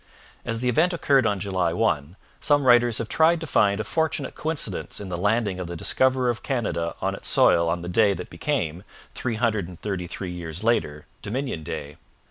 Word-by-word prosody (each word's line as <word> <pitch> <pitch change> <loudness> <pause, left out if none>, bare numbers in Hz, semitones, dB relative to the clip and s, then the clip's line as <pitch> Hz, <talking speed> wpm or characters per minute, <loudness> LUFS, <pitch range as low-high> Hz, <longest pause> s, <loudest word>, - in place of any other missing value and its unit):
As 115 0 -2
the 125 - 0
event 160 +9 +3
occurred 140 -7 +3
on 100 -1 0
July 95 -3 0
1, 85 -6 0 0.2
some 145 -1 +3
writers 120 -2 +5
have 115 - -3
tried 160 +6 +3
to 160 - -5
find 100 -8 +2
a - - -1
fortunate 160 +7 -1
coincidence 160 -1 -4
in 100 -2 -7
the 90 - -3
landing 105 0 0
of 90 - -4
the 85 - -6
discoverer 130 +7 +2
of 115 - -6
Canada 95 - -2
on - - 0
its - - -4
soil 85 0 +5
on 85 +1 -2
the - - -5
day 100 +2 +3
that 90 - -8
became, 85 - -2 0.3
three 120 -3 -3
hundred 110 -5 0
and 90 -2 -11
thirty 95 -4 -3
three 90 +1 -6
years 85 +1 -6
later, 75 -10 0 0.2
Dominion 125 - -3
Day. 75 -1 -6
105 Hz, 200 wpm, -24 LUFS, 90-125 Hz, 0.3 s, writers